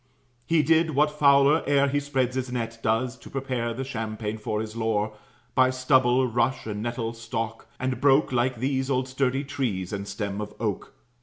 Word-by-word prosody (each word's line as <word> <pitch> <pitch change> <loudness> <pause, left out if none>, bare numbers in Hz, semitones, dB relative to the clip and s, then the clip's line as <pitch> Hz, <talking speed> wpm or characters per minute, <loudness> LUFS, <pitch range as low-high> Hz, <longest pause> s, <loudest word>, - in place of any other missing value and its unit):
He 165 -2 +3
did 160 0 +3
what 150 +1 +3
fowler, 140 +1 +4
ere 140 0 +4
he 145 +1 +1
spreads 135 -3 -1
his 130 -1 -2
net, 115 -2 -3
Does, 115 +3 0
to - - -12
prepare 130 -3 -2
the 125 +3 -4
champaign 110 -3 -4
for 105 0 -2
his 110 0 -5
lore, 110 -2 0 0.4
By 130 -1 +4
stubble, 130 0 +3
rush, 120 +2 0
and 105 -1 -4
nettle 115 0 -3
stalk; 115 -1 -5
and 130 0 -2
broke, 140 +1 +4
Like 125 +1 +1
these, 130 +2 -1
old 130 -1 +1
sturdy 135 +1 0
trees 115 -10 -3
and 100 0 -4
stems 100 0 -4
of 105 - -7
oak. - - -3
125 Hz, 180 wpm, -26 LUFS, 115-135 Hz, 0.4 s, fowler